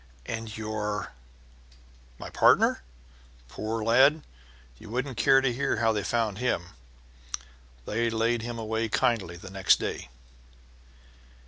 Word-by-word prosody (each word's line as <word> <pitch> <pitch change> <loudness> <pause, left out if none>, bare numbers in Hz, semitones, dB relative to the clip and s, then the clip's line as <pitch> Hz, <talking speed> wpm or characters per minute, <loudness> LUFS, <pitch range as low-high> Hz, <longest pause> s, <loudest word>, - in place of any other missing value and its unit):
"And 115 -1 -5
your 105 -1 -3 0.5
" - - -27
"My - - -8
partner? - - +4 0.7
Poor 110 - -4
lad! 135 +7 +5 0.6
You - - -12
wouldn't 125 +3 -3
care 135 +2 +5
to 130 -2 +1
hear 135 -1 0
how 115 0 +3
they 105 - -1
found 110 0 -1
him. 90 -9 -1 1.2
They 115 +2 0
laid 115 +1 +1
him 120 +1 -5
away 110 0 -2
kindly 105 -9 0
the 95 +2 -11
next 95 -1 +4
day." - - -4
110 Hz, 125 wpm, -27 LUFS, 100-120 Hz, 1.2 s, lad